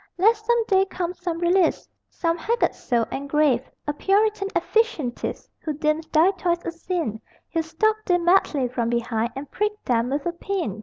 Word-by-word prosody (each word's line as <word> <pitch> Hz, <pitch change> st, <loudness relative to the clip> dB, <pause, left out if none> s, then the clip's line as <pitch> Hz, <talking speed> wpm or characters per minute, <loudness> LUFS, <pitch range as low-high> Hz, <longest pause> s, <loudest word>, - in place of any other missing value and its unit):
Lest 430 Hz, +4 st, +3 dB
some 475 Hz, -1 st, +3 dB
day 385 Hz, -2 st, +4 dB
come 360 Hz, -2 st, -3 dB
some 350 Hz, -2 st, -4 dB
realist, 350 Hz, +1 st, +2 dB, 0.2 s
Some 335 Hz, -1 st, -1 dB
haggard 465 Hz, +8 st, 0 dB
soul 235 Hz, -3 st, 0 dB
and 280 Hz, +1 st, -4 dB
grave, 275 Hz, -4 st, +2 dB, 0.2 s
A 295 Hz, -, 0 dB
puritan 405 Hz, +4 st, +2 dB
efficientist 435 Hz, -, 0 dB
Who 310 Hz, -, -3 dB
deems 305 Hz, +2 st, 0 dB
thy 330 Hz, +4 st, +4 dB
toys 345 Hz, -3 st, -1 dB
a -, -, -2 dB
sin 335 Hz, -, -3 dB, 0.3 s
He'll 330 Hz, -, 0 dB
stalk 430 Hz, +7 st, 0 dB
thee 355 Hz, -2 st, +3 dB
madly 340 Hz, -6 st, +3 dB
from 240 Hz, -1 st, -2 dB
behind 235 Hz, -1 st, 0 dB
And 275 Hz, +1 st, -7 dB
prick 420 Hz, +1 st, 0 dB
them 235 Hz, 0 st, +1 dB
with 280 Hz, +1 st, -2 dB
a 345 Hz, -, +1 dB
pin! 340 Hz, -, -3 dB
335 Hz, 175 wpm, -24 LUFS, 275-390 Hz, 0.3 s, day